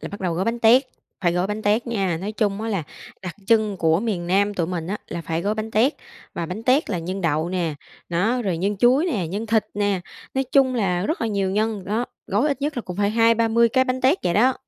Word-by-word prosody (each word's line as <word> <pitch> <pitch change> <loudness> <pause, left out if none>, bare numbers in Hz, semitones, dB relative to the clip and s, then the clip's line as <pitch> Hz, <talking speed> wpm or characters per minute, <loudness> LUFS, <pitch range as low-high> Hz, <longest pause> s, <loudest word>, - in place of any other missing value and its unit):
là - - -6
bắt 200 - -9
đầu 175 -3 -1
gói 185 +3 -1
bánh 235 +1 -1
tét, 240 +4 +6 0.4
phải 175 -2 +2
gói 180 +2 0
bánh 210 +1 -4
tét 215 +4 +1
nha. 195 -8 0
Nói 205 +3 -4
chung 205 -2 -1
á 225 - -3
là 195 -7 -1 0.4
đặc 180 -2 -6
trưng 215 -3 +3
của 165 0 +2
miền 200 -6 -2
Nam 200 +3 +2
tụi 170 -3 0
mình 170 -2 -4
á, 200 +4 -2
là 170 - -4
phải 165 +1 -2
gói 210 +2 0
bánh 220 +1 -4
tét, 240 +8 +3 0.4
và 170 - -3
bánh 200 +6 -6
tét 260 +1 +2
là 180 - -1
nhân 185 +4 -4
đậu 160 0 0
nè, 175 -4 -1 0.3
đó, 220 +9 +1
rồi 180 -5 -1
nhân 200 +3 -1
chuối 255 - +4
nè, 205 - -1
nhân 210 +5 -4
thịt 220 -1 +2
nè, 205 -2 0 0.3
nói 265 0 +1
chung 265 -2 +4
là 185 -4 0
rất 320 - -2
là 230 - 0
nhiều 200 -3 0
nhân, 210 -1 -1
đó, 220 +5 -1 0.2
gói 215 +10 +1
ít 280 -1 -2
nhất 295 -2 -1
là 240 - -2
cũng 180 0 -7
phải 205 0 +1
20-30 230 +1 +3
cái 260 +3 +3
bánh 255 0 -2
tét 275 +8 +3
vậy 175 - +1
đó. 255 +5 +4
205 Hz, 260 wpm, -23 LUFS, 180-230 Hz, 0.4 s, tét